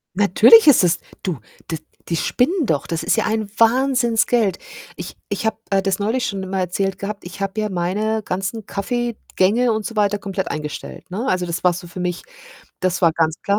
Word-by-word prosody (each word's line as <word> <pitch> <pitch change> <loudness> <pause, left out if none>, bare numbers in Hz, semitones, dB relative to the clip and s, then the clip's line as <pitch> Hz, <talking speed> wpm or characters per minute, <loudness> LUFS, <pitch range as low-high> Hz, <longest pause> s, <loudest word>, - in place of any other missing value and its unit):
Natürlich 220 - +7
ist 270 -9 +7
es 170 -1 +2 0.2
du 170 -9 -2 0.3
die 160 - -1 0.3
die 170 - -1
spinnen 300 - +1
doch. 150 - -1
Das 165 -1 -3
ist - - +2
ja 220 - +1
ein 220 -1 -1
Wahnsinnsgeld. 235 -4 +3 0.4
Ich - - -8
ich 205 +1 -3
habe, 220 - 0
äh, 195 -1 +2
das 195 0 0
neulich 230 +5 0
schon 195 -1 -3
immer 190 0 -4
erzählt 190 +1 -1
gehabt, 200 +1 -5
ich 175 +2 -9
habe 195 +2 -2
ja 215 - -1
meine 205 +5 -1
ganzen 195 +4 -3
Kaffee-Gänge 235 0 0
und 215 -1 -2
so 230 - -5
weiter 205 -1 +2
komplett 195 -1 -4
eingestellt, 150 +4 -6
ne? 220 +8 -3
Also, 180 -7 +1
das 170 0 -4
war 180 -1 +4
so 175 - -7
für 180 - -9
mich 180 0 -3 0.6
das 185 0 -1
war 165 -2 +5
ganz 160 -1 +1
klar. 200 +1 +1
200 Hz, 200 wpm, -20 LUFS, 180-225 Hz, 0.6 s, Natürlich